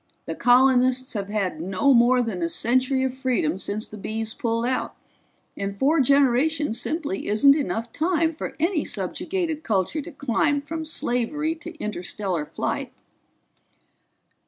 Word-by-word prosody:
The -, -, -3 dB
colonists 255 Hz, +1 st, +3 dB
have 200 Hz, -3 st, -4 dB
had 195 Hz, -6 st, -2 dB
no 190 Hz, +10 st, +2 dB
more 245 Hz, +1 st, +4 dB
than 205 Hz, -6 st, -4 dB
a 170 Hz, -, 0 dB
century 255 Hz, +6 st, +1 dB
of 260 Hz, -1 st, -1 dB
freedom 245 Hz, -, 0 dB
since 210 Hz, +2 st, -3 dB
the 215 Hz, -, -10 dB
Bees 220 Hz, +2 st, -3 dB
pulled 230 Hz, 0 st, -1 dB
out, 255 Hz, +1 st, -2 dB, 0.6 s
and 200 Hz, 0 st, -4 dB
four 285 Hz, +10 st, +2 dB
generations 275 Hz, 0 st, +2 dB
simply 300 Hz, -, -3 dB
isn't 275 Hz, +7 st, +5 dB
enough 230 Hz, -5 st, -2 dB
time 330 Hz, 0 st, +1 dB
for 310 Hz, -, -6 dB
any 335 Hz, 0 st, +1 dB
subjugated 335 Hz, -5 st, -2 dB
culture 220 Hz, -, -1 dB
to 340 Hz, -, -9 dB
climb 285 Hz, +1 st, 0 dB
from 315 Hz, +3 st, -5 dB
slavery 295 Hz, +2 st, -1 dB
to 335 Hz, 0 st, -10 dB
interstellar 185 Hz, -, -3 dB
flight." -, -, -3 dB
255 Hz, 140 wpm, -24 LUFS, 215-295 Hz, 0.6 s, isn't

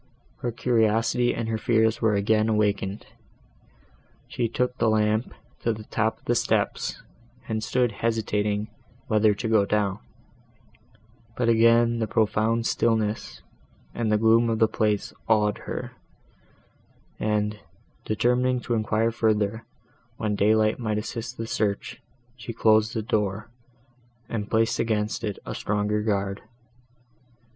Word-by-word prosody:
Her 120 Hz, -, -3 dB
curiosity 115 Hz, +1 st, +2 dB
and 115 Hz, -1 st, -3 dB
her 110 Hz, -1 st, -2 dB
fears 110 Hz, -1 st, +2 dB
were 110 Hz, -2 st, +3 dB
again 110 Hz, +2 st, +2 dB
awakened. 105 Hz, -2 st, 0 dB, 1.2 s
She 120 Hz, -, -1 dB
took 125 Hz, +2 st, -1 dB
the 115 Hz, -, +3 dB
lamp 110 Hz, +2 st, +1 dB, 0.3 s
to 115 Hz, -, 0 dB
the 110 Hz, 0 st, -9 dB
top 110 Hz, +1 st, -1 dB
of -, -, -30 dB
the 120 Hz, -, +2 dB
steps, 120 Hz, -, -1 dB, 0.4 s
and 110 Hz, -1 st, -2 dB
stood 125 Hz, 0 st, +1 dB
hesitating 105 Hz, -1 st, -1 dB, 0.4 s
whether 110 Hz, -1 st, +3 dB
to 115 Hz, -, -4 dB
go 110 Hz, -2 st, +4 dB
down; 100 Hz, -2 st, 0 dB, 1.4 s
but 120 Hz, -2 st, +1 dB
again 115 Hz, +1 st, +4 dB
the 110 Hz, -, -1 dB
profound 110 Hz, +2 st, +1 dB
stillness 110 Hz, -2 st, -1 dB, 0.5 s
and 115 Hz, -2 st, -1 dB
the 105 Hz, -, +4 dB
gloom 115 Hz, +2 st, +4 dB
of 115 Hz, -, 0 dB
the 110 Hz, 0 st, +4 dB
place 105 Hz, -1 st, -1 dB
awed 105 Hz, -2 st, +2 dB
her, -, -, -4 dB, 1.3 s
and, 105 Hz, -1 st, -1 dB, 0.4 s
determining 125 Hz, +3 st, +1 dB
to 120 Hz, -, -3 dB
enquire 110 Hz, 0 st, +1 dB
further, 110 Hz, -1 st, 0 dB, 0.5 s
when 105 Hz, -2 st, -1 dB
daylight 110 Hz, +2 st, +2 dB
might 110 Hz, -3 st, -1 dB
assist 115 Hz, +3 st, -5 dB
the 115 Hz, -, -4 dB
search, 110 Hz, 0 st, -2 dB, 0.3 s
she 120 Hz, -1 st, -7 dB
closed 110 Hz, 0 st, +3 dB
the 110 Hz, -, -1 dB
door, 105 Hz, 0 st, -2 dB, 0.8 s
and 105 Hz, -3 st, -4 dB
placed 115 Hz, 0 st, +1 dB
against 110 Hz, 0 st, -1 dB
it 105 Hz, -3 st, -3 dB
a -, -, -5 dB
stronger 105 Hz, +1 st, -1 dB
guard. 100 Hz, -2 st, -1 dB
110 Hz, 130 wpm, -25 LUFS, 105-115 Hz, 1.4 s, go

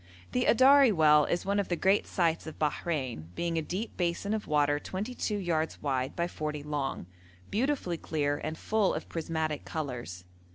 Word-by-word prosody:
The 250 Hz, 0 st, +1 dB
Adari 265 Hz, +1 st, +6 dB
well 150 Hz, -4 st, +5 dB
is 175 Hz, -, -1 dB
one 200 Hz, +1 st, +1 dB
of 200 Hz, -, -1 dB
the 175 Hz, -, 0 dB
great 195 Hz, +4 st, +2 dB
sights 165 Hz, -3 st, 0 dB
of 160 Hz, -, -8 dB
Bahrein, 145 Hz, -, -2 dB
being 170 Hz, -1 st, -1 dB
a -, -, -1 dB
deep 185 Hz, +9 st, -5 dB
basin 175 Hz, +4 st, -1 dB
of 220 Hz, -, -3 dB
water 145 Hz, -1 st, +2 dB
22 210 Hz, +4 st, -3 dB
yards 165 Hz, -4 st, -1 dB
wide 135 Hz, -1 st, -1 dB
by 170 Hz, 0 st, 0 dB
40 150 Hz, -3 st, -4 dB
long, 145 Hz, -, -3 dB, 0.5 s
beautifully 235 Hz, -, 0 dB
clear, 145 Hz, -3 st, -1 dB
and 155 Hz, +1 st, -3 dB
full 215 Hz, +1 st, +1 dB
of 155 Hz, -, -5 dB
prismatic 160 Hz, -2 st, -2 dB
colours. 125 Hz, -, -5 dB
165 Hz, 170 wpm, -30 LUFS, 150-195 Hz, 0.5 s, Adari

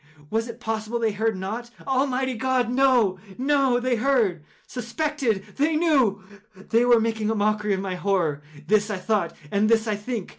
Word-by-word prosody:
Was 225 Hz, +1 st, 0 dB
it 235 Hz, 0 st, -9 dB
possible 220 Hz, 0 st, -3 dB
they 225 Hz, -2 st, +1 dB
heard 220 Hz, 0 st, -1 dB
not? 220 Hz, +6 st, -5 dB, 0.2 s
Almighty 265 Hz, -1 st, 0 dB
God!—no, 250 Hz, -4 st, +2 dB, 0.2 s
no! 270 Hz, -2 st, +2 dB
They 245 Hz, -1 st, 0 dB
heard!—they 225 Hz, -, +1 dB, 0.2 s
suspected!—they 275 Hz, +2 st, -2 dB
knew!—they 215 Hz, -, 0 dB
were 240 Hz, -1 st, +5 dB
making 220 Hz, -1 st, -1 dB
a 225 Hz, -, 0 dB
mockery 210 Hz, -1 st, +1 dB
of 190 Hz, -, -4 dB
my 190 Hz, -1 st, -3 dB
horror!—this 175 Hz, +1 st, -1 dB
I 205 Hz, -, -2 dB
thought, 185 Hz, -1 st, -1 dB, 0.2 s
and 205 Hz, +2 st, +2 dB
this 225 Hz, -1 st, +3 dB
I 215 Hz, -, 0 dB
think. 210 Hz, -1 st, -5 dB
225 Hz, 150 wpm, -24 LUFS, 205-250 Hz, 0.2 s, were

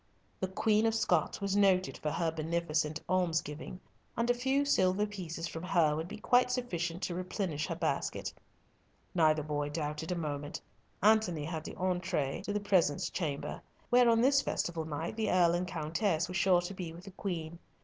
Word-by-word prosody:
The 190 Hz, -, -1 dB
Queen 215 Hz, +3 st, +2 dB
of 225 Hz, -, +1 dB
Scots 175 Hz, -7 st, +1 dB
was 200 Hz, 0 st, 0 dB
noted 190 Hz, -2 st, +3 dB
for 155 Hz, -, -3 dB
her 165 Hz, +2 st, 0 dB
beneficent 160 Hz, -1 st, -1 dB
almsgiving, 170 Hz, -2 st, -1 dB, 0.4 s
and 235 Hz, +2 st, +2 dB
a -, -, +3 dB
few 265 Hz, +3 st, +1 dB
silver 190 Hz, -6 st, +3 dB
pieces 175 Hz, -5 st, -5 dB
from 160 Hz, -, -6 dB
her 170 Hz, -4 st, +2 dB
would 160 Hz, +2 st, -3 dB
be 210 Hz, +3 st, -7 dB
quite 245 Hz, +3 st, +3 dB
sufficient 180 Hz, -9 st, -2 dB
to 175 Hz, -, -1 dB
replenish 180 Hz, -4 st, -2 dB
her -, -, -3 dB
basket. -, -, -2 dB, 0.8 s
Neither 155 Hz, -3 st, +3 dB
boy 145 Hz, -1 st, -2 dB
doubted 150 Hz, +2 st, -3 dB
a -, -, 0 dB
moment. 145 Hz, -3 st, -4 dB, 0.4 s
Antony 205 Hz, -8 st, +3 dB
had 160 Hz, -1 st, -4 dB
the -, -, -7 dB
entree 180 Hz, -7 st, -1 dB
to -, -, -2 dB
the 210 Hz, -, 0 dB
presence 185 Hz, -8 st, +2 dB
chamber, 155 Hz, -6 st, -3 dB, 0.3 s
where 245 Hz, 0 st, +6 dB
on 230 Hz, 0 st, +4 dB
this 275 Hz, +2 st, +5 dB
festival 165 Hz, -, -2 dB
night 160 Hz, +7 st, -4 dB
the 220 Hz, -1 st, 0 dB
Earl 175 Hz, -2 st, +4 dB
and 180 Hz, +1 st, -1 dB
Countess 165 Hz, +1 st, 0 dB
were 180 Hz, -, -7 dB
sure 185 Hz, -1 st, +4 dB
to 175 Hz, +2 st, -5 dB
be 180 Hz, -3 st, -5 dB
with 170 Hz, +2 st, -11 dB
the 195 Hz, -, -10 dB
Queen. 170 Hz, -4 st, -4 dB
175 Hz, 180 wpm, -32 LUFS, 160-200 Hz, 0.8 s, where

